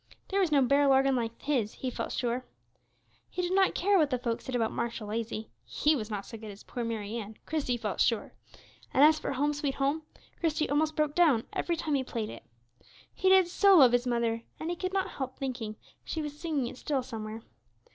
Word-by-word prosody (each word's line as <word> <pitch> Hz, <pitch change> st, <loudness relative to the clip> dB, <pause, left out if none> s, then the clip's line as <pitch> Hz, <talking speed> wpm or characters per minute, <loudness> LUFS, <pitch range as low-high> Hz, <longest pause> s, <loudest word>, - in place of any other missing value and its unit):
There 395 Hz, -, +1 dB
was 365 Hz, -5 st, +2 dB
no 280 Hz, -3 st, +5 dB
barrel 280 Hz, +1 st, +4 dB
organ 270 Hz, 0 st, +4 dB
like 230 Hz, -2 st, -2 dB
his, 255 Hz, -7 st, 0 dB
he 255 Hz, -, -4 dB
felt -, -, -4 dB
sure. 245 Hz, +1 st, -1 dB, 0.9 s
He 360 Hz, -, -3 dB
did 355 Hz, +1 st, -1 dB
not 385 Hz, 0 st, +3 dB
care 395 Hz, +1 st, +3 dB
what 300 Hz, -3 st, +3 dB
the 255 Hz, -, 0 dB
folks 235 Hz, -2 st, -3 dB
said 260 Hz, -, -3 dB
about 225 Hz, -2 st, +1 dB
Marshal 230 Hz, -3 st, -3 dB
Lazy; 220 Hz, 0 st, -4 dB
he 305 Hz, +1 st, +2 dB
was 220 Hz, -5 st, -4 dB
not 205 Hz, -2 st, -4 dB
so 225 Hz, -, -9 dB
good 220 Hz, -1 st, -8 dB
as 200 Hz, 0 st, -11 dB
poor 245 Hz, -, -5 dB
Mary 225 Hz, -1 st, -3 dB
Ann, 215 Hz, -1 st, -7 dB
Christie 280 Hz, -6 st, -1 dB
felt 210 Hz, -5 st, -2 dB
sure; 230 Hz, -3 st, +1 dB, 0.6 s
and 270 Hz, -, +5 dB
as 310 Hz, +1 st, +6 dB
for -, -, -3 dB
"Home, 290 Hz, +3 st, +1 dB
sweet 285 Hz, -2 st, -2 dB
Home," 280 Hz, +3 st, 0 dB, 0.4 s
Christie 315 Hz, -2 st, +1 dB
almost 310 Hz, +1 st, +1 dB
broke 300 Hz, -1 st, +1 dB
down 300 Hz, -10 st, +4 dB
every 340 Hz, -, 0 dB
time 315 Hz, -2 st, -2 dB
he 270 Hz, -2 st, +2 dB
played 225 Hz, -4 st, -4 dB
it. -, -, -9 dB, 0.7 s
He 375 Hz, -, +2 dB
did 380 Hz, -2 st, +6 dB
so 395 Hz, +2 st, +5 dB
love 265 Hz, -8 st, +8 dB
his 245 Hz, +1 st, +2 dB
mother, 235 Hz, -1 st, 0 dB, 0.2 s
and 320 Hz, +2 st, -3 dB
he -, -, -2 dB
could 370 Hz, +2 st, -3 dB
not 385 Hz, -1 st, 0 dB
help 260 Hz, -1 st, -5 dB
thinking 245 Hz, -5 st, -4 dB, 0.3 s
she 320 Hz, -, -4 dB
was 295 Hz, -1 st, -5 dB
singing 300 Hz, -4 st, -1 dB
it 245 Hz, +1 st, -6 dB
still 280 Hz, -4 st, -1 dB
somewhere. 225 Hz, -2 st, -6 dB
265 Hz, 220 wpm, -30 LUFS, 230-310 Hz, 0.9 s, love